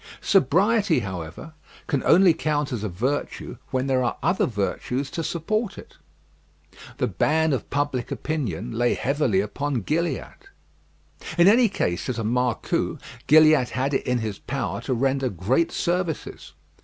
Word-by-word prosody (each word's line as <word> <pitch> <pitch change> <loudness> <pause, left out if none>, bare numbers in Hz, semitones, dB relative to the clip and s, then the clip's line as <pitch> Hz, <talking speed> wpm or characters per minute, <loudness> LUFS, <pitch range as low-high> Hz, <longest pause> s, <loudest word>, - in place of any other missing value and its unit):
Sobriety, 195 - +3
however, 95 - -7 0.3
can 140 - -1
only 180 0 +6
count 150 -2 -1
as 115 -4 -3
a 105 - -2
virtue 125 +6 -3
when 130 0 -1
there 130 -2 +1
are 120 - -1
other 185 - +2
virtues 125 +5 -2
to 170 -1 -3
support 200 +7 -2
it. - - -13 1.0
The - - +1
ban 160 0 +1
of 130 - -3
public 140 -4 -1
opinion 120 - -3
lay 120 +1 +1
heavily 125 -6 +1
upon 140 +4 -2
Gilliatt. 170 - -3 0.9
In 175 +1 +6
any 230 +2 +6
case, 90 - -2
as 125 - -2
a 115 - -2
marcou, 120 +1 0 0.3
Gilliatt 155 -4 +6
had 135 +2 -1
it - - -1
in 125 0 +2
his 110 -4 -4
power - - -3
to 130 - -2
render 135 +1 +1
great 115 - 0
services. 175 -2 -3
135 Hz, 145 wpm, -24 LUFS, 120-160 Hz, 1.0 s, only